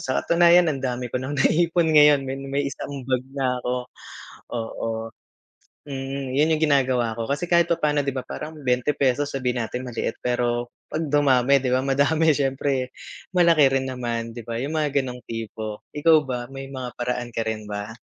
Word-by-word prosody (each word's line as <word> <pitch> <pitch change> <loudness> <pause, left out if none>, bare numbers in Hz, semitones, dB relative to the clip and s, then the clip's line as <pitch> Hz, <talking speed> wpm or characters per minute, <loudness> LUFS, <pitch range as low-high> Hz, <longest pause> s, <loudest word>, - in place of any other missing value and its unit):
Sa 130 - -2
katunayan 170 -1 +5
ang 135 - -5
dami 125 -2 -3
ko 125 - -1
ng 135 +3 -4
naipon 165 +3 +2
ngayon, 150 -2 +6
may 135 +1 -4
may 140 +1 -2
isang 140 -1 -5
bag 130 0 -1
na 125 -2 0
ako, 125 0 -2 0.7
oo. 115 0 -4 1.0
Mm, 135 0 -4
yun 155 +3 +3
yung 155 - -3
ginagawa 130 -6 +2
ko 115 - -2
kasi 145 +7 -2
kahit 170 -1 +5
papaano, 150 -4 +1
'di 140 - -1
ba, 130 - -3
parang 155 +4 -7
₱20 135 +2 +1
sabihin 125 -2 -1
natin 125 - -5
maliit 120 -2 -3
pero 120 -1 0 0.2
'pag 160 - -3
dumami, 140 -2 +4
'di 130 -1 -2
ba, 130 - +2
madami, 145 +4 +2
siyempre 135 -2 -1 0.4
malaki 170 -5 +5
rin 130 - -4
naman, 120 -2 -3
'di 120 - -7
ba, 115 -1 -3
yung 155 +4 -2
mga 145 -2 +1
gano'ng 125 -1 -7
tipo. 110 -1 -6
Ikaw 160 +2 +5
ba 125 -2 -3
may 135 0 -7
mga 130 -3 -6
paraan 120 0 -2
ka 115 - 0
rin 110 -1 -3
ba? 105 +1 -5
135 Hz, 180 wpm, -24 LUFS, 125-145 Hz, 1.0 s, ngayon